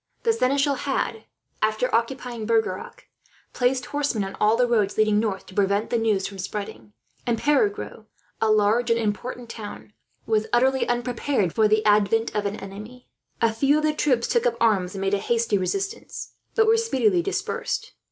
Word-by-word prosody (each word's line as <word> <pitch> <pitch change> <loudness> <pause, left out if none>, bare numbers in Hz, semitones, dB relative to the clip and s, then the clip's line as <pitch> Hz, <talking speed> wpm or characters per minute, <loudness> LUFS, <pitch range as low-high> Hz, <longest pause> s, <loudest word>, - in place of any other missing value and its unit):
The 460 - +3
seneschal 280 - +2
had, 265 -5 -2 0.4
after 215 +3 0
occupying 235 -1 -1
Bergerac, 225 - -1 0.5
placed 250 0 +1
horsemen 285 -6 -1
on 195 0 -6
all 215 +2 +4
the 250 - +4
roads 215 -4 +1
leading 215 -1 +3
north, 210 -3 -2
to - - -14
prevent 200 +2 +1
the 240 - +2
news 215 -4 +1
from 195 -1 -7
spreading; 185 - -6 0.3
and 235 -1 +1
Perigueux, 295 - 0 0.3
a 220 - +3
large 215 +3 +3
and 230 - +3
important 235 +3 -3
town, 210 -2 -9 0.3
was 215 -1 +1
utterly 260 +2 +2
unprepared 240 - 0
for 220 -1 +4
the 215 +1 +2
advent 210 +2 +3
of 205 -1 0
an 200 - -3
enemy. 215 +6 -10 0.3
A 225 -1 +3
few 275 +6 +3
of 305 - -1
the 310 0 +2
troops 255 -6 +1
took 475 +1 +2
up 480 - -1
arms 200 -5 +2
and 195 - -4
made 195 +1 0
a 200 - +2
hasty 230 -2 +1
resistance, 395 - -4 0.2
but 445 - +4
were 445 +1 +4
speedily 435 -5 +2
dispersed. 395 +3 -3
230 Hz, 175 wpm, -24 LUFS, 210-265 Hz, 0.5 s, all